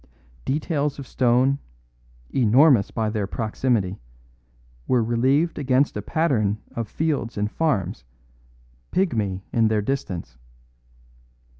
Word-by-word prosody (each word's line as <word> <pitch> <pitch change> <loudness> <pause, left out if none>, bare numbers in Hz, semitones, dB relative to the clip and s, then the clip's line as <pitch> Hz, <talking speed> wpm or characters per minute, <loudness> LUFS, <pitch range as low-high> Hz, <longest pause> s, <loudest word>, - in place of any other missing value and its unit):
Details 150 0 -1
of 140 - -7
stone, 130 +2 +2 0.7
enormous 125 -1 +5
by 110 -1 -1
their 105 -3 -2
proximity, 110 -3 -1 0.9
were 125 -2 +3
relieved 135 +9 +1
against 135 0 +2
a 105 - -2
pattern 110 -7 +1 0.2
of 115 -2 -3
fields 145 -5 -2
and 105 +1 -1
farms, 105 - -1 0.9
pygmy 110 - 0
in 115 -2 +3
their 110 -1 +1
distance. 100 - -4
120 Hz, 105 wpm, -23 LUFS, 105-140 Hz, 0.9 s, enormous